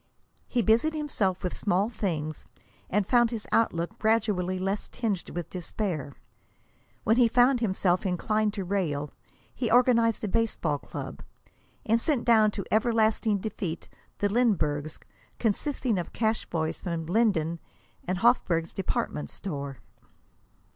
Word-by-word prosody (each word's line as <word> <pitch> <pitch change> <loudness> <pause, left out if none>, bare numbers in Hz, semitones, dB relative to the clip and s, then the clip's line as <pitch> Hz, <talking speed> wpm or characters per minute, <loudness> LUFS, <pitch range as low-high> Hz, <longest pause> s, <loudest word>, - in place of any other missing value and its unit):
He 240 -2 0
busied 230 +10 +3
himself 215 -12 -1
with 180 - -2
small 200 +1 +1
things, 160 -9 -3 0.4
and 205 +1 +1
found 240 +1 +4
his 225 -3 -4
outlook 215 -1 +1
gradually 210 -5 +1
less 195 +2 -2
tinged 215 -7 -3
with 175 -1 -5
despair. 175 -5 -3 0.9
When 220 +2 +3
he 245 -2 +6
found 245 +2 +4
himself 190 -5 +1
inclined 210 +3 0
to 200 - -2
rail, 160 -7 -1 0.4
he 240 -4 -2
organized 235 -2 +4
a - - 0
baseball 185 -8 0
club, - - -7 0.6
and 230 +1 +2
sent 280 -4 0
down 220 -3 +5
to 200 -2 -5
everlasting 220 -1 +2
defeat 190 -5 -5 0.3
the 205 - +1
Linburgs, 185 -10 +1 0.4
consisting 235 -1 0
of 175 - -6
cash 220 -1 0
boys 160 -1 -2
from 170 -3 -3
Linden 170 -4 +1 0.4
and 185 +1 -2
Hofburg's 175 -9 +2
department 195 -5 -2
store. 140 -7 -5
205 Hz, 130 wpm, -27 LUFS, 175-230 Hz, 0.9 s, he